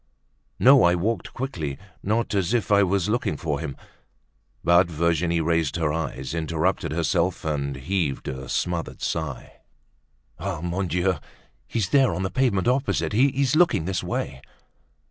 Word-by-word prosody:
"No, 135 Hz, +1 st, +7 dB
I 85 Hz, 0 st, +5 dB
walked 100 Hz, +2 st, -2 dB
quickly, 80 Hz, -, -4 dB, 0.2 s
not 110 Hz, +3 st, 0 dB
as 100 Hz, +3 st, +1 dB
if 115 Hz, -3 st, -1 dB
I 100 Hz, 0 st, +6 dB
was 95 Hz, -1 st, +1 dB
looking 105 Hz, -8 st, 0 dB
for 75 Hz, -3 st, -2 dB
him." 75 Hz, -4 st, -5 dB, 0.9 s
But 85 Hz, +1 st, +5 dB
Virginie 85 Hz, +1 st, +1 dB
raised 80 Hz, -2 st, +1 dB
her 80 Hz, -3 st, 0 dB
eyes, 75 Hz, -4 st, -4 dB
interrupted 80 Hz, -3 st, -1 dB
herself 85 Hz, +2 st, 0 dB
and 70 Hz, -3 st, -1 dB
heaved 75 Hz, +1 st, -2 dB
a 65 Hz, 0 st, -5 dB
smothered 85 Hz, -2 st, -2 dB
sigh. 80 Hz, -6 st, -4 dB, 0.8 s
"Ah! 90 Hz, -1 st, -3 dB
Mon 90 Hz, +2 st, -2 dB
Dieu! 90 Hz, +1 st, +1 dB, 0.5 s
He's 105 Hz, -6 st, -1 dB
there, 135 Hz, -8 st, +4 dB
on 95 Hz, -, -2 dB
the 95 Hz, -, -2 dB
pavement 120 Hz, -7 st, +1 dB
opposite; 130 Hz, -2 st, +1 dB
he's 135 Hz, +3 st, +2 dB
looking 170 Hz, -, +3 dB
this 95 Hz, 0 st, -2 dB
way." -, -, -3 dB
85 Hz, 145 wpm, -24 LUFS, 80-105 Hz, 0.9 s, No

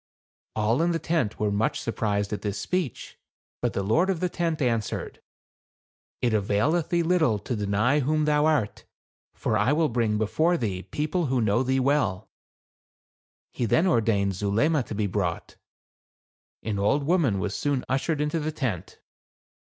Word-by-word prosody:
All 110 Hz, +5 st, +1 dB
in 170 Hz, +1 st, +2 dB
the -, -, +1 dB
tent 160 Hz, -10 st, -1 dB
were 105 Hz, -1 st, +1 dB
much 105 Hz, +3 st, 0 dB
sur 115 Hz, -, -3 dB
prised 105 Hz, -2 st, -1 dB
at 105 Hz, -, -4 dB
this 105 Hz, -1 st, -3 dB
speech. 170 Hz, -, -3 dB, 0.4 s
But -, -, 0 dB
the 100 Hz, -, -1 dB
lord 160 Hz, -, +2 dB
of 185 Hz, -4 st, 0 dB
the 180 Hz, -, 0 dB
tent 170 Hz, -2 st, -1 dB
answered, 115 Hz, -6 st, -2 dB, 1.0 s
"It 120 Hz, -2 st, +2 dB
availeth 110 Hz, -, +1 dB
thee 170 Hz, -1 st, +2 dB
little 160 Hz, -10 st, +2 dB
to 110 Hz, +5 st, -4 dB
deny 105 Hz, +7 st, +1 dB
who 155 Hz, +2 st, +1 dB
thou 150 Hz, 0 st, +3 dB
art; 145 Hz, -10 st, 0 dB, 0.5 s
for -, -, -1 dB
I 120 Hz, +7 st, +3 dB
will 155 Hz, 0 st, +2 dB
bring 115 Hz, -3 st, 0 dB
before 160 Hz, +11 st, +1 dB
thee 100 Hz, -, -2 dB
people 155 Hz, -, -2 dB
who 130 Hz, -1 st, +1 dB
know 110 Hz, +1 st, +2 dB
thee 130 Hz, +1 st, +1 dB
well." 130 Hz, -9 st, 0 dB, 1.2 s
He 120 Hz, -, -1 dB
then 160 Hz, -, +3 dB
ordered 110 Hz, -, +2 dB
Zuleima 110 Hz, -, +1 dB
to -, -, -5 dB
be 105 Hz, 0 st, 0 dB
brought. 95 Hz, -3 st, -3 dB, 1.1 s
An 105 Hz, -2 st, -2 dB
old 140 Hz, +9 st, +2 dB
woman 150 Hz, -, +2 dB
was 95 Hz, +1 st, -2 dB
soon 140 Hz, -3 st, -1 dB
ushered 140 Hz, +4 st, 0 dB
into 150 Hz, +2 st, 0 dB
the 155 Hz, +1 st, -2 dB
tent. 125 Hz, -, -4 dB
125 Hz, 165 wpm, -26 LUFS, 105-155 Hz, 1.2 s, thou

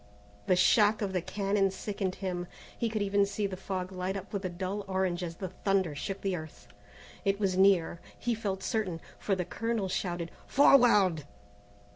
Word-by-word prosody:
The 185 Hz, -, +4 dB
shock 210 Hz, +3 st, +4 dB
of 195 Hz, -1 st, -2 dB
the 180 Hz, -, 0 dB
cannon 195 Hz, +2 st, +1 dB
sickened 190 Hz, -1 st, -3 dB
him. 180 Hz, -2 st, -3 dB, 0.3 s
He 230 Hz, -, -1 dB
could 215 Hz, -2 st, -1 dB
even 200 Hz, 0 st, +3 dB
see 200 Hz, +1 st, -1 dB
the 195 Hz, -1 st, -3 dB
fog 185 Hz, -1 st, -4 dB
light 185 Hz, +1 st, -3 dB
up 195 Hz, +2 st, -9 dB
with 200 Hz, -1 st, -2 dB
a 185 Hz, -, -1 dB
dull 190 Hz, +3 st, -4 dB
orange 190 Hz, -2 st, 0 dB
as 170 Hz, -2 st, -4 dB
the 185 Hz, +1 st, -5 dB
thunder 190 Hz, -3 st, 0 dB
shook 195 Hz, +7 st, -5 dB
the 195 Hz, -2 st, 0 dB
earth. 155 Hz, -3 st, -9 dB, 0.6 s
It 200 Hz, -1 st, +1 dB
was 195 Hz, -3 st, +1 dB
near, 185 Hz, -3 st, +3 dB, 0.2 s
he 240 Hz, -, -1 dB
felt 195 Hz, -4 st, -3 dB
certain, 200 Hz, -8 st, -1 dB, 0.2 s
for 200 Hz, -, 0 dB
the 180 Hz, -2 st, -2 dB
colonel 225 Hz, +1 st, -2 dB
shouted 175 Hz, -2 st, -2 dB, 0.2 s
"Forward!" 210 Hz, -, +5 dB
190 Hz, 180 wpm, -30 LUFS, 180-205 Hz, 0.6 s, Forward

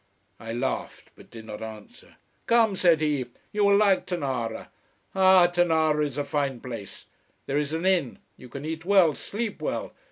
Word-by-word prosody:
I 115 Hz, -1 st, -7 dB
laughed, 125 Hz, +3 st, -4 dB
but -, -, -17 dB
did 115 Hz, -1 st, -11 dB
not 105 Hz, -1 st, -8 dB
answer. 110 Hz, -, -11 dB, 0.3 s
"Come," 230 Hz, -4 st, +4 dB
said 170 Hz, -4 st, +3 dB
he. 145 Hz, -5 st, 0 dB, 0.2 s
"You 210 Hz, -1 st, +1 dB
will 200 Hz, 0 st, +5 dB
like 200 Hz, -2 st, +3 dB
Tonara! 130 Hz, -10 st, -3 dB, 0.4 s
Ah, 190 Hz, -1 st, +6 dB
Tonara 160 Hz, -3 st, +2 dB
is 145 Hz, -2 st, -3 dB
a 145 Hz, -, 0 dB
fine 140 Hz, -3 st, -2 dB
place. 115 Hz, -6 st, -8 dB, 0.4 s
There 140 Hz, +2 st, 0 dB
is 150 Hz, -1 st, -2 dB
an 165 Hz, +3 st, -2 dB
inn: 180 Hz, -9 st, +1 dB, 0.2 s
you 125 Hz, -, -14 dB
can 140 Hz, +4 st, -7 dB
eat 160 Hz, +1 st, -4 dB
well, 185 Hz, -4 st, +4 dB
sleep 215 Hz, +6 st, -5 dB
well. -, -, -3 dB
155 Hz, 170 wpm, -26 LUFS, 130-185 Hz, 0.4 s, Ah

